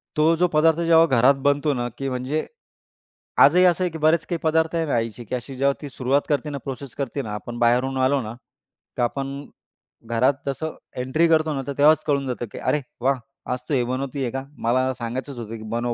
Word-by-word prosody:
तो 155 +2 +4
जो 180 +2 +3
पदार्थ 160 0 +3
जेव्हा 165 -1 +5
घरात 130 -2 +4
बनतो 145 +1 +2
ना, 120 -2 -2
की 135 0 -3
म्हणजे 130 +4 -2 1.0
आजही 175 +6 +6
असं 180 0 +3
आहे, 180 - 0
की 160 - -6
बरेच 160 +1 +2
काही 175 - -1
पदार्थ 160 +1 +2
आहे 165 -1 +1
ना 150 - -2
आईची, 115 0 -3
की 125 - -3
अशी 125 +2 -6
जेव्हा 140 +2 +2
ती 145 - -6
सुरुवात 135 +2 +1
करते 145 0 0
ना, 145 - -4
प्रोसेस 135 -1 -7
करते 140 0 -3
ना, 105 -5 -6
आपण 120 +3 -7
बाहेरून 125 +3 +2
आलो 135 +1 +2
ना, 110 -1 -6 0.6
तर 125 - +1
आपण 135 +3 -2 0.7
घरात 115 +4 +2
जसं 155 +3 -3 0.2
एंट्री 130 +7 +2
करतो 155 -1 +2
ना, 135 - -2
तर 140 - -2
तेव्हाच 155 +2 +5
कळून 140 -2 +1
जातं, 125 -1 -3
की - - -9
"अरे 150 - 0 0.2
वाह! 135 +1 +2 0.3
आज 125 - -3
तू - - 0
हे 125 - +2
बनवतीये 130 0 -3
का? 135 +2 -4
मला 130 +3 +1
सांगायचंच 125 +3 -5
होतं, 115 -1 -6
की 110 - -10
बनव 120 0 -1
135 Hz, 215 wpm, -23 LUFS, 125-155 Hz, 1.0 s, आजही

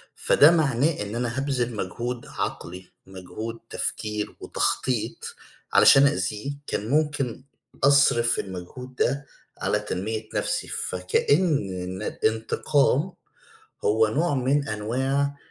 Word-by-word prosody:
فده 150 +3 +5
معناه 150 -3 +1
إن 105 +2 -5
أنا 120 +1 -2
هابذِل 125 -4 -1
مجهود 120 +5 -4
عقلي، 90 +1 -5
مجهود 95 +5 -7
تفكير 105 -1 -3
وتخطيط - - -2 0.4
علشان 140 +1 +7
أأذيه، 105 +3 -2 0.2
كان 105 +3 -3
ممكن 145 -4 0 0.4
أصرِف 140 -4 +4
المجهود 100 +8 -7
ده 140 +4 0 0.3
على 105 - 0
تنمية 110 +2 -4
نَفْسي، - - -1
فكأن 90 - 0 0.6
ن - - -5
الانتقام 135 - +1 0.7
هو 110 +1 +3
نوع 145 +7 0
من 140 +2 +1
أنواع 135 +7 -1
120 Hz, 105 wpm, -25 LUFS, 105-140 Hz, 0.7 s, علشان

